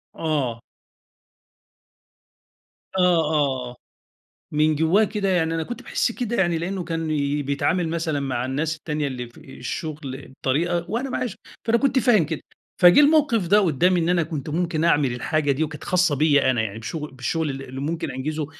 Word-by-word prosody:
آه. 135 Hz, -8 st, -1 dB, 2.3 s
آه، -, -, 0 dB
آه، 150 Hz, -7 st, +2 dB
آه. 120 Hz, -, -12 dB, 0.8 s
من 155 Hz, +1 st, +2 dB
جوّاه 160 Hz, +8 st, +3 dB
كده 205 Hz, -2 st, -1 dB
يعني 165 Hz, -3 st, +1 dB
أنا 165 Hz, -, -1 dB
كنت 240 Hz, -, -7 dB
باحس 235 Hz, -, 0 dB
كده 235 Hz, 0 st, -3 dB
يعني 175 Hz, -4 st, +2 dB
لإنّه 180 Hz, +2 st, -3 dB
كان 165 Hz, -1 st, -3 dB, 0.4 s
بيتعامل 160 Hz, +5 st, 0 dB
مثلًا 165 Hz, -3 st, -1 dB
مع 130 Hz, -3 st, -2 dB
الناس 150 Hz, +5 st, -1 dB
التانية 150 Hz, -1 st, -3 dB
اللي 125 Hz, -2 st, -5 dB
في 120 Hz, -, -14 dB
الشغل 145 Hz, 0 st, -6 dB
بطريقة، 170 Hz, +6 st, 0 dB
وأنا 250 Hz, +4 st, -2 dB
معش 245 Hz, -5 st, -3 dB, 0.3 s
فأنا 230 Hz, +1 st, +3 dB
كنت 270 Hz, +1 st, +2 dB
فاهم 220 Hz, -8 st, +4 dB
كده. 155 Hz, 0 st, -4 dB, 0.4 s
فجِه 175 Hz, +7 st, +8 dB
الموقف 285 Hz, -, +4 dB
ده 205 Hz, +3 st, +5 dB
قدّامي 180 Hz, +1 st, +2 dB
إن 165 Hz, +1 st, 0 dB
أنا 175 Hz, -2 st, +3 dB
كنت 155 Hz, -3 st, -5 dB
ممكن 165 Hz, 0 st, -1 dB
أعمل 145 Hz, -6 st, +3 dB
الحاجة 145 Hz, +4 st, 0 dB
دي 140 Hz, +3 st, 0 dB
وكانت 155 Hz, -1 st, -6 dB
خاصة 180 Hz, -4 st, +2 dB
بيّا 145 Hz, -2 st, +3 dB
أنا 120 Hz, -3 st, 0 dB
يعني 110 Hz, 0 st, -4 dB
بشغ 150 Hz, +7 st, -5 dB
بالشغل 145 Hz, +4 st, -2 dB
ال 135 Hz, 0 st, -5 dB
اللي 130 Hz, 0 st, -7 dB
ممكن 160 Hz, +4 st, -3 dB
أنجِزُه 150 Hz, +4 st, -3 dB
160 Hz, 170 wpm, -23 LUFS, 140-180 Hz, 2.3 s, فجِه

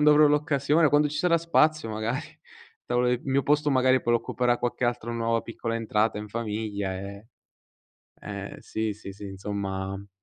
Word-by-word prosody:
quando 150 Hz, 0 st, +6 dB
avrò 150 Hz, 0 st, +7 dB
l'occasione, 150 Hz, +1 st, +3 dB
quando 145 Hz, 0 st, +4 dB
ci 150 Hz, -, -4 dB
sarà 175 Hz, 0 st, +3 dB
spazio 155 Hz, -5 st, +2 dB
magari. 110 Hz, +1 st, -2 dB, 0.5 s
Il -, -, -73 dB
tavo 120 Hz, 0 st, +1 dB
il 125 Hz, 0 st, 0 dB
mio 135 Hz, 0 st, +1 dB
posto 150 Hz, 0 st, +2 dB
magari 130 Hz, 0 st, +4 dB
poi 120 Hz, 0 st, +1 dB
lo -, -, +4 dB
occuperà 120 Hz, +1 st, 0 dB
qualche 120 Hz, 0 st, -1 dB
altra 120 Hz, -1 st, -2 dB
nuova 115 Hz, 0 st, 0 dB
piccola 115 Hz, 0 st, -4 dB
entrata 110 Hz, -1 st, 0 dB
in 105 Hz, 0 st, -6 dB
famiglia, 105 Hz, -3 st, -3 dB
ehm 100 Hz, +1 st, -7 dB, 1.0 s
eh, 100 Hz, -1 st, -6 dB
sì, 110 Hz, -1 st, -2 dB
sì, 100 Hz, -2 st, -9 dB
sì 100 Hz, +1 st, -9 dB
insomma 95 Hz, 0 st, -4 dB
115 Hz, 175 wpm, -26 LUFS, 105-140 Hz, 1.0 s, avrò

